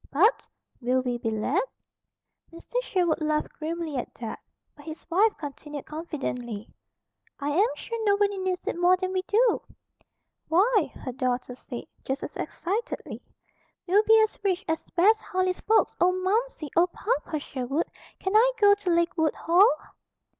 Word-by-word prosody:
"But, 410 Hz, -, +3 dB, 0.3 s
will 250 Hz, +2 st, +2 dB
we 245 Hz, -1 st, -2 dB
be 230 Hz, -2 st, -1 dB
let?" 225 Hz, -, 0 dB, 0.9 s
Mr. 340 Hz, +9 st, -4 dB
Sherwood 355 Hz, -9 st, 0 dB
laughed 305 Hz, 0 st, 0 dB
grimly 320 Hz, -2 st, -3 dB
at 245 Hz, -, -4 dB
that; 230 Hz, -2 st, -6 dB, 0.4 s
but 290 Hz, -, -15 dB
his 320 Hz, 0 st, -8 dB
wife 415 Hz, +5 st, +3 dB
continued 290 Hz, 0 st, -7 dB
confidently: 250 Hz, -9 st, -5 dB, 0.7 s
"I 285 Hz, 0 st, -2 dB
am 385 Hz, +9 st, +4 dB
sure 460 Hz, -1 st, -5 dB
nobody 405 Hz, -1 st, +2 dB
needs 370 Hz, -1 st, -2 dB
it -, -, -2 dB
more 360 Hz, +1 st, +5 dB
than 370 Hz, 0 st, -3 dB
we 375 Hz, -, +1 dB
do." 445 Hz, +5 st, +2 dB, 0.9 s
"Why!" 395 Hz, +2 st, +3 dB
her 255 Hz, -, -6 dB
daughter 250 Hz, 0 st, -2 dB
said, 245 Hz, -1 st, -8 dB, 0.2 s
just 265 Hz, +1 st, -3 dB
as -, -, -6 dB
excitedly, 430 Hz, +8 st, -4 dB, 0.6 s
"we'll 385 Hz, +3 st, +4 dB
be 445 Hz, +1 st, +6 dB
as 435 Hz, -, -2 dB
rich 375 Hz, -3 st, 0 dB
as 320 Hz, 0 st, -2 dB
Bess 430 Hz, +5 st, +4 dB
Harley's 370 Hz, 0 st, -1 dB
folks. 440 Hz, +1 st, +3 dB
Oh, 360 Hz, +1 st, +5 dB
Momsey! 375 Hz, -, -1 dB
Oh, 340 Hz, +2 st, +5 dB
Papa 365 Hz, -3 st, -2 dB
Sherwood! 275 Hz, +2 st, -2 dB, 0.3 s
Can 380 Hz, +2 st, -2 dB
I 480 Hz, +3 st, +6 dB
go 410 Hz, -1 st, +6 dB
to 405 Hz, -2 st, -2 dB
Lakewood 340 Hz, -2 st, +2 dB
Hall?" 360 Hz, +6 st, +5 dB
345 Hz, 155 wpm, -27 LUFS, 290-405 Hz, 0.9 s, be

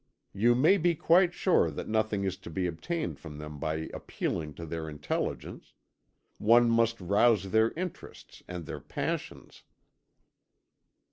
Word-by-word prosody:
You 120 Hz, +5 st, +3 dB
may 160 Hz, +11 st, +4 dB
be 175 Hz, 0 st, +2 dB
quite 175 Hz, +3 st, +4 dB
sure 175 Hz, -, +2 dB
that 75 Hz, -, -6 dB
nothing 110 Hz, -2 st, 0 dB
is 95 Hz, -1 st, -1 dB
to -, -, -11 dB
be 90 Hz, +3 st, -2 dB
obtained 155 Hz, -, -3 dB
from 75 Hz, -3 st, -9 dB
them 75 Hz, -1 st, -8 dB
by 80 Hz, +1 st, -2 dB
appealing 75 Hz, -2 st, -4 dB
to 85 Hz, -, -7 dB
their 80 Hz, 0 st, -5 dB
intelligence; 75 Hz, -1 st, -4 dB, 0.6 s
one 120 Hz, +2 st, +5 dB
must 115 Hz, 0 st, +2 dB
rouse 100 Hz, +1 st, +2 dB
their 110 Hz, +1 st, +4 dB
interests 180 Hz, +1 st, -8 dB
and 90 Hz, -2 st, -6 dB
their 80 Hz, -, -6 dB
passions." -, -, -5 dB
105 Hz, 140 wpm, -29 LUFS, 80-120 Hz, 0.6 s, one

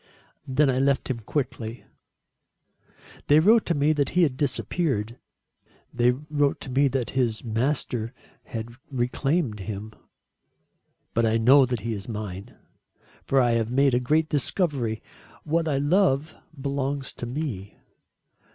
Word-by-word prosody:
Then 140 Hz, +3 st, +3 dB
I 130 Hz, -1 st, +1 dB
left 135 Hz, 0 st, +1 dB
him 120 Hz, -, -3 dB
quickly. 120 Hz, -1 st, -4 dB, 1.4 s
They 145 Hz, +1 st, +6 dB
wrote 215 Hz, +6 st, +5 dB
to 170 Hz, -, +1 dB
me 145 Hz, +2 st, +3 dB
that 145 Hz, -3 st, 0 dB
he 180 Hz, 0 st, +3 dB
had 140 Hz, -6 st, +1 dB
disappeared. 130 Hz, -4 st, -1 dB, 0.7 s
They 120 Hz, 0 st, +3 dB
wrote 145 Hz, +2 st, 0 dB
to 130 Hz, -, -5 dB
me 140 Hz, +2 st, +3 dB
that 130 Hz, -2 st, -2 dB
his 120 Hz, -4 st, 0 dB
master 120 Hz, -1 st, -1 dB, 0.3 s
had 115 Hz, 0 st, -5 dB, 0.2 s
reclaimed 130 Hz, 0 st, -1 dB
him. 105 Hz, +2 st, -6 dB, 1.2 s
But 115 Hz, 0 st, +2 dB
I 110 Hz, +1 st, +2 dB
know 130 Hz, +4 st, +6 dB
that 125 Hz, -3 st, -2 dB
he 115 Hz, +1 st, -2 dB
is 100 Hz, +2 st, -7 dB
mine. 105 Hz, -3 st, -6 dB, 0.7 s
For 135 Hz, -, +3 dB
I 120 Hz, -2 st, +3 dB
have 115 Hz, -1 st, +1 dB
made 135 Hz, +1 st, +3 dB
a 125 Hz, -, +3 dB
great 155 Hz, +5 st, +2 dB
discovery. 140 Hz, -, -1 dB, 0.4 s
What 165 Hz, +2 st, 0 dB
I 145 Hz, -3 st, +1 dB
love 150 Hz, -1 st, +2 dB, 0.3 s
belongs 140 Hz, 0 st, -2 dB
to 120 Hz, -, -6 dB
me. 120 Hz, -8 st, -5 dB
130 Hz, 140 wpm, -25 LUFS, 115-145 Hz, 1.4 s, They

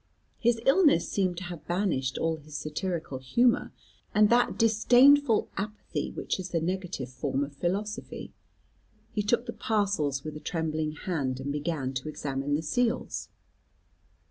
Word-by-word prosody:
His 235 Hz, 0 st, +2 dB
illness 285 Hz, -, +5 dB
seemed 185 Hz, -3 st, 0 dB
to 185 Hz, -, -5 dB
have 175 Hz, -3 st, -8 dB
banished 170 Hz, -8 st, 0 dB
all 160 Hz, 0 st, 0 dB
his 155 Hz, -1 st, -9 dB
satirical 155 Hz, -3 st, -3 dB
humour, 235 Hz, -, +2 dB, 0.4 s
and 210 Hz, +1 st, +5 dB
that 245 Hz, +1 st, +3 dB
disdainful 245 Hz, +3 st, +5 dB
apathy 210 Hz, +2 st, -3 dB
which -, -, -3 dB
is 185 Hz, 0 st, -5 dB
the 170 Hz, -, 0 dB
negative 180 Hz, -5 st, -3 dB
form 130 Hz, +2 st, -2 dB
of 140 Hz, 0 st, -6 dB
philosophy. 200 Hz, +9 st, -3 dB, 0.8 s
He 215 Hz, -, 0 dB
took 235 Hz, +4 st, +1 dB
the -, -, -5 dB
parcels 195 Hz, -, 0 dB
with 155 Hz, -1 st, -6 dB
a -, -, -6 dB
trembling 155 Hz, -2 st, -2 dB
hand, 145 Hz, -6 st, -2 dB
and 140 Hz, +2 st, -3 dB
began 145 Hz, -3 st, -2 dB
to 130 Hz, +3 st, -4 dB
examine 140 Hz, -1 st, -2 dB
the 155 Hz, -, -2 dB
seals. 240 Hz, +9 st, -1 dB
175 Hz, 145 wpm, -28 LUFS, 145-215 Hz, 0.8 s, illness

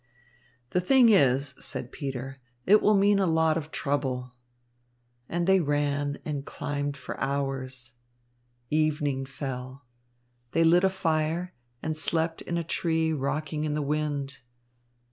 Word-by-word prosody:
"The 180 Hz, -, +2 dB
thing 245 Hz, +5 st, +6 dB
is," 140 Hz, -, +4 dB
said 125 Hz, -, -5 dB
Peter, 135 Hz, -2 st, -5 dB, 0.3 s
"it 210 Hz, +3 st, +6 dB
will 210 Hz, -, +4 dB
mean 200 Hz, 0 st, +4 dB
a 190 Hz, -, +2 dB
lot 160 Hz, -1 st, +3 dB
of 155 Hz, -2 st, -3 dB
trouble." 130 Hz, -4 st, -2 dB, 1.0 s
And 175 Hz, 0 st, 0 dB
they 190 Hz, +1 st, +5 dB
ran 145 Hz, -2 st, 0 dB
and 145 Hz, -3 st, -3 dB
climbed 145 Hz, 0 st, -3 dB
for -, -, -7 dB
hours. 135 Hz, -3 st, -3 dB, 0.8 s
Evening 150 Hz, -3 st, +1 dB
fell. 130 Hz, 0 st, -6 dB, 0.7 s
They 165 Hz, -, +4 dB
lit 175 Hz, +2 st, +5 dB
a 190 Hz, -, +5 dB
fire, 165 Hz, -1 st, -1 dB, 0.3 s
and 155 Hz, 0 st, -1 dB
slept 160 Hz, +1 st, 0 dB
in 170 Hz, -, -3 dB
a 170 Hz, -, -1 dB
tree 160 Hz, -1 st, 0 dB
rocking 150 Hz, +2 st, -2 dB
in 150 Hz, -1 st, -1 dB
the 150 Hz, -, 0 dB
wind. 145 Hz, -2 st, -2 dB
150 Hz, 135 wpm, -27 LUFS, 140-165 Hz, 1.0 s, thing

